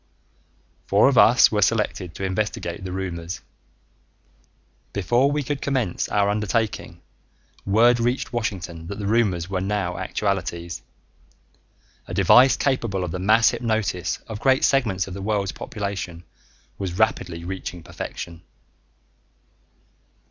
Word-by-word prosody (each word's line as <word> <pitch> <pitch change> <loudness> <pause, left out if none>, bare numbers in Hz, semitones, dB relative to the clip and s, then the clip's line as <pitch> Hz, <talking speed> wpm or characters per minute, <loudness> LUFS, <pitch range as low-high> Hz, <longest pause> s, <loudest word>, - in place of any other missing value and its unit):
Four 100 +6 +5
of 140 - 0
us 120 +2 +7
were 105 -1 +1
selected 100 -4 0
to - - -6
investigate 95 -2 -2
the 95 - -5
rumors. 90 -2 -4 1.5
Before 120 +8 +2
we 145 0 0
could 145 0 -3
commence 130 -10 -1
our 100 -1 +2
undertaking, 105 -4 -2 0.6
word 120 +4 +5
reached 125 +3 -1
Washington 90 -8 -4
that 100 - -6
the 105 - -4
rumors 100 -6 +1
were 95 -1 -2
now 95 -3 -2
actualities. 90 -3 -2 1.3
A - - -5
device 130 +2 +6
capable 115 -9 0
of 90 - -3
the 90 - -4
mass 110 +5 +4
hypnosis 110 -6 -1
of 110 -2 -6
great 130 +2 +3
segments 110 -9 +2
of 95 - -7
the 100 - -6
world's 100 -1 -1
population 100 -5 -5 0.6
was 95 -3 -3
rapidly 90 -6 0
reaching 90 -2 -6
perfection. 85 0 -7
100 Hz, 125 wpm, -23 LUFS, 90-115 Hz, 1.5 s, us